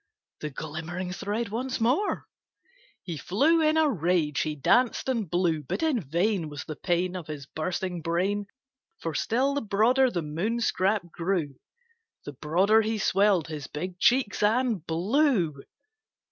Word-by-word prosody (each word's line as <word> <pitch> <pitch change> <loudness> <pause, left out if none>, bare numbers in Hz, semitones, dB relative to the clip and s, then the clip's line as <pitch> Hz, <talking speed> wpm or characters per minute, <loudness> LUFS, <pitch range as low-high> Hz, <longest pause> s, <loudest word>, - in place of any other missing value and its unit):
The 150 - -4
glimmering 160 +5 -5
thread 205 +4 -3
once 250 +4 -3
more! 260 - +1 0.8
He 170 -4 -5
flew 285 - +2
in 310 0 +3
a 315 -1 +4
rage 170 - +1
he 155 -1 -2
danced 240 - +2
and 230 -9 -1
blew; 175 -3 +1
But 325 - -3
in 295 -8 +1
vain 170 +3 0
Was 145 -1 -7
the 155 - -6
pain 180 +2 -1
Of 175 -4 -6
his 150 -3 -6
bursting 175 +4 -3
brain; 190 +5 -1 0.5
For 165 - -4
still 255 - +1
the 285 - -1
broader 230 +6 +3
the 175 -8 -3
Moon 175 +11 -2
scrap 190 -5 0
grew, 165 -6 -2 0.7
The 145 - -6
broader 185 - +3
he 220 0 -1
swelled 195 -4 +2
his 150 -3 -6
big 180 +4 -6
cheeks 250 -1 +2
and 220 -3 +2
blew. 190 - +2
185 Hz, 150 wpm, -27 LUFS, 160-230 Hz, 0.8 s, a